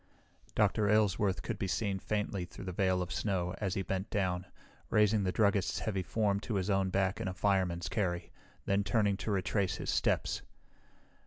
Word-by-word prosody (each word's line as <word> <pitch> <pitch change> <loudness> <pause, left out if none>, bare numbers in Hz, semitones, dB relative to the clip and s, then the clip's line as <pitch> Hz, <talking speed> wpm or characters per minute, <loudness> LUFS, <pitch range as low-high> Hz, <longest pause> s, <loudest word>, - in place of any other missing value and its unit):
Dr. 105 0 +3
Aylesworth 105 -2 +2
could 115 -4 -4
be 95 - -1
seen 100 0 -1
faintly 105 -2 -2
through 90 - -10
the 90 - -3
veil 95 0 +1
of 90 - -7
snow 90 -4 -1
as 100 -2 -1
he 95 - -1
bent 95 +2 -3
down, 90 -2 -1 0.4
raising 105 -1 +4
the 90 - +1
druggist's 100 -1 +2
heavy 100 -4 -1
form 100 +1 +1
to 105 +1 -4
his 95 +1 0
own 95 -1 +2
back 95 +3 0
in 110 - -2
a 90 - -3
fireman's 90 -5 +1
carry, 85 -2 -2 0.3
then 100 +1 +2
turning 100 0 +2
to 110 - -4
retrace 100 0 0
his - - -3
steps. - - +1
100 Hz, 180 wpm, -32 LUFS, 95-105 Hz, 0.4 s, raising